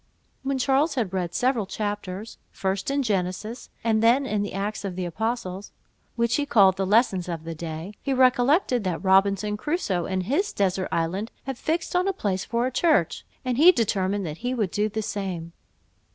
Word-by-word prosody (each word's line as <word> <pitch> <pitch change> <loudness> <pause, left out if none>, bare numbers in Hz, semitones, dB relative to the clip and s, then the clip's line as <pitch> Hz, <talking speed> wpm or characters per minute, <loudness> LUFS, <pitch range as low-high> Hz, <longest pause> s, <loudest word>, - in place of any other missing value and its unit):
When 275 0 -1
Charles 275 +4 +2
had 220 -8 -1
read 175 -2 -2
several 245 -5 +1
chapters, 205 0 -4
first 190 +2 -2
in 280 0 +1
Genesis, 205 +2 -2
and 220 -1 +2
then 240 +5 +4
in 210 -5 -1
the 205 - -3
Acts 205 +2 -3
of 195 -3 -4
the 185 0 -3
Apostles, 200 +1 -3 0.4
which 235 -1 +1
he 290 - 0
called 200 -9 +5
the 195 0 -1
lessons 195 -4 +2
of 165 -2 -4
the 165 0 -5
day, 160 +4 -6
he 275 - -2
recollected 255 - +3
that 180 -2 -2
Robinson 200 +2 +3
Crusoe, 210 - -1
in 190 -1 -1
his 285 - 0
desert 190 -1 0
island, 185 +7 -1
had 270 -1 -4
fixed 325 +7 -2
on 360 +2 +2
a 390 - +1
place 190 - -2
for 235 +1 -1
a 260 - -1
church, 295 - +1 0.2
and 250 0 0
he 345 +4 +9
determined 200 - 0
that 155 -1 -5
he 250 +2 -2
would 210 -7 -1
do 210 +1 0
the 220 +1 -3
same. 180 -5 -4
210 Hz, 190 wpm, -25 LUFS, 185-250 Hz, 0.4 s, he